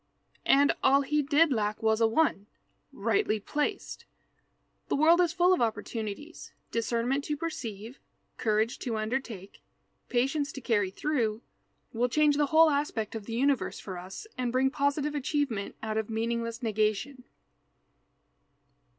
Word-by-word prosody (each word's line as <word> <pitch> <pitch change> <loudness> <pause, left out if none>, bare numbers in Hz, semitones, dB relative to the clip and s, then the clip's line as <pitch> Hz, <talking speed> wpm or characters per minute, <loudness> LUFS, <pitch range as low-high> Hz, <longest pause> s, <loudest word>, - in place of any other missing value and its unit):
And 280 +1 +5
all 275 +1 +5
he 300 +2 +1
did 295 +1 +3
lack 215 -1 -2
was 220 0 +2
a 225 - +5
one, 225 -5 +1 0.4
rightly 395 - 0
placed. 295 - -3 0.8
The - - 0
world 330 +4 +5
is 345 -2 +2
full 355 +1 +4
of 365 - 0
opportunities. 225 +6 -4 0.2
Discernment 235 +4 0
to 295 - -2
perceive, 240 - -6 0.4
courage 220 +1 0
to 230 -3 -3
undertake, 215 -3 -4 0.5
patience 275 +3 0
to - - -6
carry 210 -5 +1
through, 230 -1 -1 0.5
will 240 +2 +1
change 300 +2 +3
the 295 -1 +2
whole 315 +1 +6
aspect 280 -7 -1
of 220 -3 -7
the 225 - -4
universe 270 +1 +1
for 190 - -7
us 185 - -9
and 245 -1 0
bring 260 +2 +2
positive 285 +2 0
achievement 280 -7 -2
out 220 0 -2
of 220 - -4
meaningless 230 +1 -2
negation. 215 +4 -1
245 Hz, 140 wpm, -29 LUFS, 220-290 Hz, 0.8 s, whole